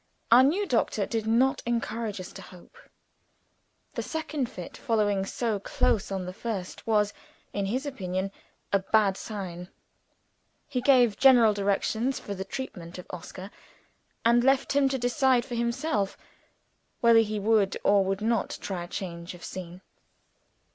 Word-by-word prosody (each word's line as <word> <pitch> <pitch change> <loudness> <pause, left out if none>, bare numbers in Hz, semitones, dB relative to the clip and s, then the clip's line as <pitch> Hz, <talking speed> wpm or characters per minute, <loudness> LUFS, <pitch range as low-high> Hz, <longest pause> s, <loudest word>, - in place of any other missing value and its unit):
Our 240 +2 +9
new 330 +10 +3
doctor 225 - +1
did 225 0 -3
not 260 +5 +3
encourage 230 -3 -2
us 185 - -7
to - - -9
hope. 180 -2 -15 1.2
The - - -2
second 310 -5 -3
fit 180 - -8
following 205 -4 0
so 225 -2 -1
close 200 +1 0
on 190 -2 -2
the 180 - -6
first 200 -3 -5
was, 210 -2 +2 0.4
in 200 -1 -1
his 255 +8 -2
opinion, 190 -8 -3 0.4
a 200 - +5
bad 200 0 +2
sign. 185 -4 -6 1.0
He 255 -3 -2
gave 245 -5 +4
general 245 -5 +7
directions 205 +5 0
for 200 - -6
the 190 -1 -4
treatment 185 -7 -7
of 180 - -8
Oscar; 185 +2 -8 0.7
and 235 +1 +5
left 270 +1 +3
him 280 -1 +4
to 265 - -1
decide 250 0 +2
for - - -7
himself 235 -3 -1 0.8
whether 235 -1 +7
he 215 -1 0
would 205 -2 +2
or 200 -1 +4
would 195 +1 -2
not 230 0 0
try 175 -3 -4
change 170 -1 -6
of 175 - -14
scene. 180 0 -8
215 Hz, 150 wpm, -27 LUFS, 195-245 Hz, 1.2 s, Our